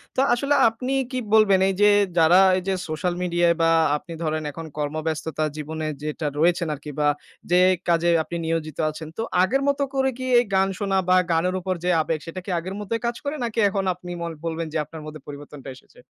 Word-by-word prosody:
তো - - -1
আসলে 280 +4 +1
আপনি 250 +4 -4 0.2
কী 255 - -1
বলবেন, 210 -3 +5
এইযে 205 +2 +4 0.3
যারা 165 +3 +6 0.2
এইযে 190 +1 -2
সোশ্যাল 155 +3 -2
মিডিয়ায় 175 -1 +2
বা 165 - +4 0.3
আপনি 170 +3 -10
ধরেন 155 0 -1
এখন 165 +3 -8
কর্মব্যস্ততার 155 +1 -2
জীবনে 155 +1 -4 0.2
যেটা 150 +1 -4
রয়েছেন 170 +1 +2
আরকি 150 +1 -8
বা 150 - +3 0.4
যে 180 - +5 0.3
কাজে 170 0 +3
আপনি 170 - -7
নিয়োজিত 160 -2 -2
আছেন। 155 +1 -8
তো - - -2 0.2
আগের 265 +9 +1
মত 280 0 +1
করে 265 -1 +2
কি 255 - -5
এই - - +3
গান 190 0 +3
শোনা 195 -1 0
বা 185 - +6
গানের 175 +3 +1
উপর 185 +1 -2
যে 180 - 0
আবেগ 155 0 -2
সেটা 170 +2 -6
কি - - -7
আগের 185 +3 -6
মতোই 225 +2 -3
কাজ 235 0 -1
করে 290 +1 -3
নাকি 230 -1 -2
এখন 195 0 -1
আপনি 180 0 -10
ম - - -2 0.2
বলবেন 165 0 -3
যে - - 0
আপনার 160 +1 -10
মধ্যে 155 -1 -9
পরিবর্তনটা 145 -1 -9
এসেছে? 130 - -20
170 Hz, 200 wpm, -23 LUFS, 155-195 Hz, 0.4 s, যারা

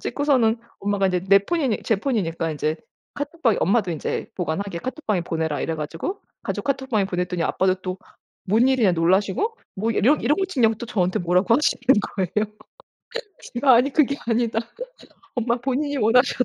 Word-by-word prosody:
찍고서는 255 -6 +1 0.2
엄마가 200 -1 +1
인제 180 -1 0
내 195 - +8
폰이니 270 - -1
제 220 - +2
폰이니까 180 - -1
인제 155 +1 -1 0.4
카톡방에 290 - 0
엄마도 200 0 +2
인제 155 - -3
보관하게 180 +1 -3
카톡방에 225 - -2
보내라 160 -3 -2
이래 165 - -1
가지고 165 - -4 0.2
가족 - - -3
카톡방에 265 -6 0
보냈더니 180 -2 -2
아빠도 185 +2 +2
또 185 0 -5 0.5
뭔 230 +6 +4
일이냐 235 -8 +3
놀라시고 190 - +1 0.2
뭐 220 +4 -1
이런 255 +7 +3
이런 295 - +2
거 385 - +2
찍냐고 235 -11 +2
또 235 - -7
저한테 185 -6 0
뭐라고 180 +5 +2
하시는 295 -2 0 0.3
거예요. 210 +3 -1 1.0
제가 255 +1 +5
아니 255 +4 +4
그게 280 -2 +3
아니다. 230 -1 +1 0.8
엄마 235 0 +1
본인이 275 +4 -2
원하셨다. 250 +2 +3
220 Hz, 390 characters per minute, -23 LUFS, 185-260 Hz, 1.0 s, 내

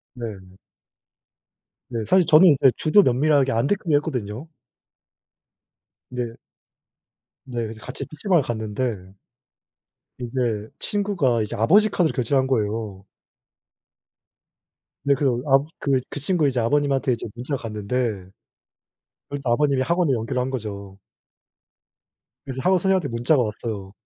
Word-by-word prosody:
네. 100 -6 -8 1.3
네. 120 -2 -3
사실 185 -2 +4
저는 165 +3 +7
이제 135 - +6
주도면밀하게 145 -5 +3
안 115 +2 +1
들키게 175 -5 +1
했거든요. 125 -3 -4 1.6
네. 120 -2 -4 1.1
네. 120 -2 -3
그래서 110 0 -9
같이 - - -6
피시방을 170 +2 +1
갔는데 110 -4 -4 1.1
이제 115 -3 -2
친구가 185 - 0
이제 105 - -3
아버지 200 - +4
카드로 175 -5 +1
결제를 135 +2 +1
한 130 - 0
거에요. 105 -5 -2 2.0
네 140 - +3
그 125 -4 +1
압 135 +1 +5 0.2
그 135 -2 +2
그 - - -6
친구 155 0 +1
이제 130 -2 0
아버님한테 135 +2 +1
이제 115 - -5
문자 125 +4 -3
갔는데 105 -1 -5 1.3
그리고 145 -1 -5
또 125 - 0
아버님이 140 +1 +2
학원에 170 +1 +1
연결을 120 +1 -1
한 130 - -3
거죠. 100 -6 -6 1.5
그래서 130 -1 -5
학원 185 0 +4
선생한테 190 -3 +1
문자가 120 +5 +2
왔어요. 105 -3 -4
130 Hz, 270 characters per minute, -23 LUFS, 115-145 Hz, 2.0 s, 저는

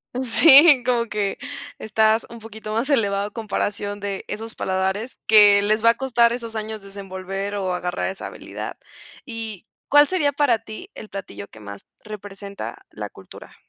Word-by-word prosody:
Sí, 270 +2 +7
como 240 -2 +2
que 205 -2 -2 0.4
estás 220 +1 +2
un 235 0 -10
poquito 220 -1 -9
más 235 +6 -1
elevado 200 -6 +2
a - - -9
comparación 205 -2 -3
de 200 -1 -4
esos 225 +1 -6
paladares, 190 +5 -2
que 205 -2 +7
les 215 +2 +1
va 230 - +7
a - - -7
costar 240 -3 +3
esos 230 -2 -5
años 215 -1 -5
desenvolver 195 0 -6
o 190 -2 -1
agarrar 180 +1 -2
esa 190 - -6
habilidad. - - -8 0.5
¿Y 225 -5 -6 0.2
cuál 290 0 +7
sería 310 -6 +1
para 270 -6 +2
ti 225 - -10
el 215 - -10
platillo 105 - -8
que 110 - -15
más 100 -1 -9 0.2
representa 200 -1 -8
la - - -7
cultura? - - -14
215 Hz, 160 wpm, -22 LUFS, 200-230 Hz, 0.5 s, Sí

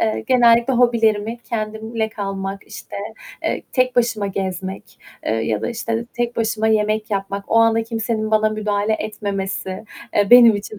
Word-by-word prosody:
eee, 220 -1 0
genellikle 240 0 +4
hobilerimi 230 -2 +2
kendimle 220 0 -3
kalmak, 195 -2 -5
işte, - - -9 0.5
eee, - - -1
tek 255 -1 +1
başıma 230 -4 +1
gezmek, 190 0 -5 0.3
eee, - - +1
ya 110 -1 -1
da, - - -2
işte, 230 0 -3
tek 240 -1 -2
başıma 220 -1 0
yemek 215 0 +1
yapmak, 200 0 -3
o - - +1
anda 225 0 +4
kimsenin 225 -1 -2
bana 215 0 +3
müdahale 210 0 -1
etmemesi, 195 -2 -4 0.3
eee, 205 0 +2
benim 230 -4 +7
için 205 +1 -8
215 Hz, 150 wpm, -20 LUFS, 200-230 Hz, 0.5 s, benim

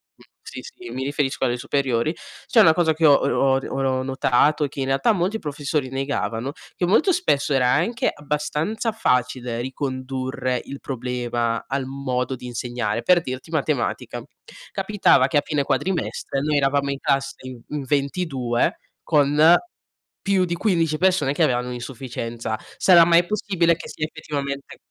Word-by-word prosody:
mhmm, - - -21 0.2
sì, - - -8
sì, 475 -6 -12
io - - -7
mi 130 - -3
riferisco 140 -1 -1
alle 120 - +1
superiori, 135 +1 0 0.3
c'è 235 - +4
una 165 -7 +7
cosa 160 -1 +2
che 160 +1 +1
ho 145 - +8
ho 135 -1 +2
ho 130 -1 -1
notato, 140 +3 +2
che 140 - -10
in 130 - -1
realtà 135 - +2
molti 195 +4 -1
professori 145 -1 -2
negavano, 135 -3 -2 0.2
che 180 - 0
molto 260 - +3
spesso 150 - +1
era 130 -2 +3
anche 175 - +1
abbastanza 150 +9 -2
facile 125 - 0
ricondurre 130 -1 -3
il 140 - -8
problema 120 -2 -2
al 135 0 -2
modo 130 -1 -2
di 125 - -9
insegnare. 120 -2 -3
Per 175 +6 +4
dirti: 130 0 -6
matematica. 150 -4 -2 0.5
Capitava 195 -9 +3
che 140 - +1
a - - +4
fine 150 -2 0
quadrimestre, 170 -4 -2
noi 150 +1 +1
eravamo 140 0 +1
in 140 - -3
classe 135 0 0
in 130 -2 -9
in 150 -1 -3
22 135 -3 -1 0.2
con 150 +2 +5 0.7
più 195 -2 +2
di 170 -1 -2
15 165 -5 +1
persone 180 -6 +2
che - - +1
avevano 125 0 +1
un'insufficienza. 120 -2 -5 0.2
Sarà 175 -3 +7
mai 170 +1 +5
possibile 180 -4 +1
che - - -9
sia 155 - -3
effettivamente 140 -3 -5
140 Hz, 155 wpm, -23 LUFS, 130-160 Hz, 0.7 s, ho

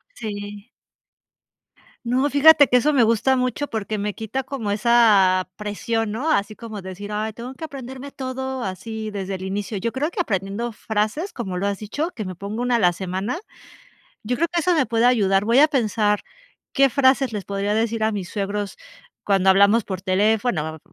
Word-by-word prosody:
Sí. 205 - -7 1.4
No, 255 +4 +1
fíjate 290 +1 +7
que 250 - +5
eso 295 +5 +2
me 260 -4 +5
gusta 230 +4 +3
mucho 255 +3 -1
porque 215 -1 -3
me 205 0 -2
quita 225 +5 -4
como 245 -6 -4
esa 205 -5 +4
presión, 210 +1 -2
¿no?, 280 +9 -1
así 215 -5 0
como 220 -3 -8
decir: 190 +3 -8
"Ay, 215 +1 -2
tengo 245 +3 -8
que 320 - -6
aprenderme 265 -1 -8
todo 265 -1 -4
así 215 +3 -5
desde 195 -1 -4
el 185 - -8
inicio", 200 +2 -3
yo 230 +5 -2
creo 290 +6 -1
que 355 0 -2
aprendiendo 200 - -2
frases, 220 - -2
como 190 -7 -4
lo 200 - -1
has 200 -1 -2
dicho, 290 - -3
que 215 - -4
me 185 -2 -6
pongo 205 +6 -5
una 245 -1 +2
a - - -1
la 180 -4 +4
semana, 190 - -3 0.9
yo 245 +3 -2
creo 335 +2 +1
que 345 -1 0
eso 360 +2 +2
me 300 -5 +2
puede 230 +1 0
ayudar, 200 -6 +3
voy 235 +5 +4
a 305 - +7
pensar 215 -7 +1 0.5
qué 275 -3 +4
frases 265 -2 +3
les 205 - -3
podría 200 +1 -2
decir 225 0 0
a 220 - 0
mis 195 -3 -4
suegros 200 0 -3 0.5
cuando 195 -1 +3
hablamos 200 +3 +5
por 190 -2 -5
teléfono, 190 -4 0
220 Hz, 185 wpm, -22 LUFS, 200-255 Hz, 1.4 s, fíjate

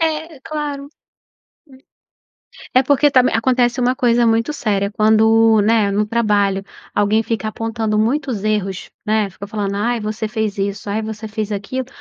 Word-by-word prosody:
É, 315 -2 -2
claro, 290 -1 -5
hum, - - -14 1.8
é 255 - +5
porque 285 +2 +3
também 255 -2 +3
acontece 245 +1 +2
uma 250 +1 +1
coisa 240 -2 +3
muito 230 +5 +1
séria 200 -8 -1
quando, 220 +1 +4
né, 215 -1 +2
no 210 +1 0
trabalho 205 -4 +1 0.3
alguém 210 +2 +2
fica 220 -2 -2
apontando 220 -1 -2
muitos 230 -2 -1
erros, 200 -3 -2 0.2
né, 215 -1 +1
fica 200 +2 -10
falando: 205 -2 -3
"Ai 235 +4 0
você 215 +1 -3
fez 215 -2 -3
isso, 200 +1 -3
ai 210 +2 -1
você 220 0 -6
fez 215 -1 -4
aquilo", 215 +6 -4
220 Hz, 155 wpm, -18 LUFS, 210-245 Hz, 1.8 s, é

